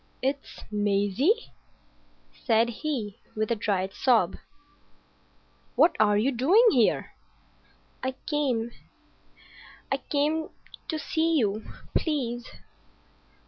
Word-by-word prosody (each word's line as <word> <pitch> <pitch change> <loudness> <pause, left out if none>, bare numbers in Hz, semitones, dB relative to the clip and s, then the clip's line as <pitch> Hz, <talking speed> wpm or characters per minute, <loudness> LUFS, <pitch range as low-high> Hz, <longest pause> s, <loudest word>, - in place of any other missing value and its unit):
"It's 275 +1 -3
Maisie!" 205 - +1 0.8
said 230 0 +2
he, 235 -5 -4 0.2
with 215 +1 -1
a - - +3
dry 200 -3 0
sob. 220 -3 +2 1.4
"What 330 0 +5
are 210 -1 +4
you 240 +6 +2
doing 320 - +4
here?" 240 - +2 0.9
"I 260 0 -2
came—I 250 -6 -5
came—to 310 +2 -3
see 320 +1 0
you, 215 -4 0 0.3
please." 240 -7 -1
245 Hz, 85 wpm, -27 LUFS, 215-300 Hz, 1.4 s, What